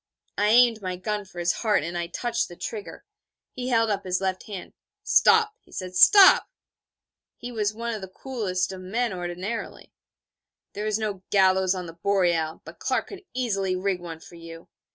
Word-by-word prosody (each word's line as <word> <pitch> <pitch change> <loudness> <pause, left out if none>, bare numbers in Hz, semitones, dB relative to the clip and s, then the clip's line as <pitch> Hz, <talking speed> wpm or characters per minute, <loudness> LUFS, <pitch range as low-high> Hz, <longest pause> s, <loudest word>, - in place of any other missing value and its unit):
_' 205 - +1
I - - +4
aimed 230 0 +5
my 185 -1 -3
gun 210 +3 -3
for 185 - -17
his 175 0 +1
heart, 215 -9 +1
and 170 +2 -5
I 170 -1 -2
touched 235 +6 -2
the 175 - -11
trigger. 210 +3 -7 0.5
He 250 0 -5
held 230 -3 +2
up 200 -1 -2
his 185 -1 -1
left 190 -1 -3
hand. 200 -4 -8 0.3
'Stop,' 445 -1 +4
he - - -26
said, 185 -1 -6
'stop.' 390 - +7 0.9
(He 245 - -7
was 215 -2 -1
one 235 +1 -3
of 215 - -5
the 190 - -6
coolest 195 -4 -3
of 190 -1 -8
men 225 +4 -2
ordinarily.) 180 +5 -5 0.8
'There 210 +1 -4
is 215 -1 +1
no 210 -4 -3
gallows 190 -1 +3
on 180 -1 -5
the 165 - -9
Boreal, 170 -3 0
but - - -12
Clark - - -1
could 390 -2 -9
easily 195 -7 -1
rig 185 0 -1
one 165 -2 -8
for 160 - -15
you. 165 0 -11
195 Hz, 190 wpm, -25 LUFS, 180-225 Hz, 0.9 s, stop